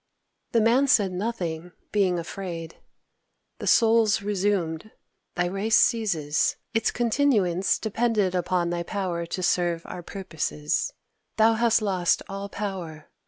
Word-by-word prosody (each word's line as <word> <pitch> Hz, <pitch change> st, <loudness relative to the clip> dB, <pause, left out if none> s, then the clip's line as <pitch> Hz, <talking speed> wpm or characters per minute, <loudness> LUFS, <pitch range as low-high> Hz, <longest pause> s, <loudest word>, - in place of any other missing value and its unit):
The 230 Hz, -, +4 dB
Man 245 Hz, +5 st, +4 dB
said 205 Hz, -7 st, +3 dB
nothing, 180 Hz, -4 st, -4 dB, 0.2 s
being 195 Hz, -4 st, +2 dB
afraid. 170 Hz, -1 st, -6 dB, 0.8 s
The -, -, -5 dB
Souls 225 Hz, -3 st, +4 dB
resumed: 200 Hz, -3 st, -1 dB, 0.5 s
"Thy 175 Hz, -, +1 dB
race 195 Hz, +5 st, +1 dB
ceases. 170 Hz, -11 st, +2 dB, 0.2 s
Its 225 Hz, -1 st, +2 dB
continuance 220 Hz, -7 st, +1 dB
depended 220 Hz, -3 st, 0 dB
upon 175 Hz, -1 st, 0 dB
thy 175 Hz, 0 st, -2 dB
power 170 Hz, -2 st, -3 dB
to 185 Hz, +2 st, -4 dB
serve 175 Hz, -1 st, +1 dB
our 180 Hz, -, -7 dB
purposes. 160 Hz, -5 st, -3 dB, 0.5 s
Thou 225 Hz, +1 st, +5 dB
hast 230 Hz, 0 st, +2 dB
lost 185 Hz, -4 st, +1 dB
all 195 Hz, +1 st, -6 dB
power. 180 Hz, -7 st, -6 dB
195 Hz, 120 wpm, -25 LUFS, 175-220 Hz, 0.8 s, Thou